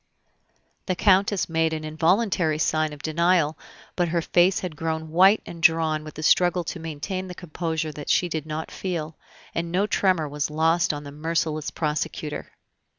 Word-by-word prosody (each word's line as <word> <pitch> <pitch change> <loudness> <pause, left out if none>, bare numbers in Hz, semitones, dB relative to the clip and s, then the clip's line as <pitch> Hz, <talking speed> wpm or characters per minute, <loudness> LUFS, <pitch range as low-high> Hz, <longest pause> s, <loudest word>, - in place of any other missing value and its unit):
The 185 - 0
Countess 195 +1 +3
made 160 -1 +1
an 155 -1 -4
involuntary 160 +1 +1
sign 155 0 +1
of 145 -1 -11
denial, 165 -1 +2 0.4
but 175 -1 +1
her 170 0 0
face 180 +3 +3
had 180 -4 -5
grown 160 0 -3
white 190 +5 +5
and 170 -1 -9
drawn 160 -2 +3
with 155 - -10
the 155 - -6
struggle 180 +2 +3
to 170 - -5
maintain 165 +4 -4
the 180 - -8
composure 160 -2 -3
that 145 -1 -8
she 180 - +3
did 160 -2 -4
not 155 +1 -5
feel, 165 -4 -4 0.4
and 170 0 -3
no 190 +4 +2
tremor 185 -6 +1
was 145 +1 -2
lost 160 +3 +2
on 145 -1 -6
the 140 - -9
merciless 155 0 -2
prosecutor. 150 -1 -3
160 Hz, 170 wpm, -24 LUFS, 155-180 Hz, 0.4 s, white